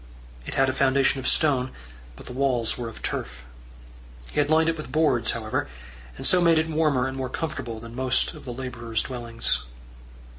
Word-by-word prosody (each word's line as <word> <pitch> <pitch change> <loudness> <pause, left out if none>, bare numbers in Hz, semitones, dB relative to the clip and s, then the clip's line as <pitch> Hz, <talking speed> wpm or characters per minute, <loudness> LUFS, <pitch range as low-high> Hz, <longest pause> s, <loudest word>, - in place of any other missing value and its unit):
It - - -4
had 135 0 +4
a 130 - 0
foundation 135 0 +2
of 130 - -3
stone, 130 -4 +3 0.5
but - - -13
the 125 - -8
walls 125 -4 +1
were 120 -2 -5
of 110 - -12
turf. 60 0 -4 0.9
He - - -1
had 145 0 +2
lined 160 +1 +4
it 165 - +2
with 155 - -8
boards, 150 -6 +3
however, 110 -2 -1 0.5
and - - -5
so 180 - +6
made 165 -2 +5
it 160 +1 +2
warmer 155 -5 +1
and 130 - -5
more 130 -1 -3
comfortable 125 -7 -4
than 115 +1 -10
most 130 0 +2
of - - -11
the 125 - -6
labourers' 120 -3 -3
dwellings. 120 - -2
130 Hz, 190 wpm, -25 LUFS, 120-150 Hz, 0.9 s, so